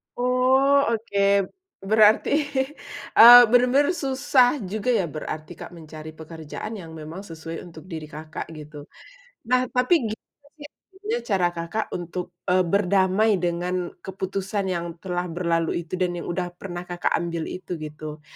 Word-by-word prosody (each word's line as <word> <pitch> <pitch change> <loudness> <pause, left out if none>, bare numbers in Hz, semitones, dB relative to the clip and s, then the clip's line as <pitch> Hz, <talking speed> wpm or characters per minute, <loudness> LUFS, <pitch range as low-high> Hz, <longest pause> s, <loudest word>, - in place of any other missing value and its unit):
Oh, 255 +3 +3 0.2
oke. 220 -2 -4 0.7
Berarti, 215 0 +5 0.9
eee, 240 +2 +12
benar-benar 250 +6 +4
susah 265 -3 +2
juga 215 +6 -3
ya, 225 -7 +2
berarti, 155 +1 -6
Kak, - - -10
mencari 155 -1 -10
pekerjaan 160 +6 -8
yang 175 -7 -9
memang 160 +5 -8
sesuai 165 -3 -8
untuk 160 -1 -13
diri 160 -4 -7
Kakak, 155 +1 -8
gitu. 150 -2 -11 0.6
Nah, 255 0 +3
tapi 250 +4 +2
gimana 225 +6 -9
sih 295 -2 -11
akhirnya 415 +8 -6
cara 190 -6 +2
Kakak 170 +7 -3
untuk, 175 +1 -5 0.2
eee, 185 0 +3
berdamai 195 +3 +2
dengan 175 0 -2 0.2
keputusan 195 +1 -3
yang 170 -2 -3
telah 180 -1 -3
berlalu 170 -1 -1
itu 170 +2 -6
dan 180 -1 0
yang - - -7
udah 175 0 -3
pernah 175 -1 -7
Kakak 175 0 -1
ambil 170 -1 -4
itu, 185 -1 -6
gitu? 150 0 -8
180 Hz, 140 wpm, -24 LUFS, 165-225 Hz, 0.9 s, eee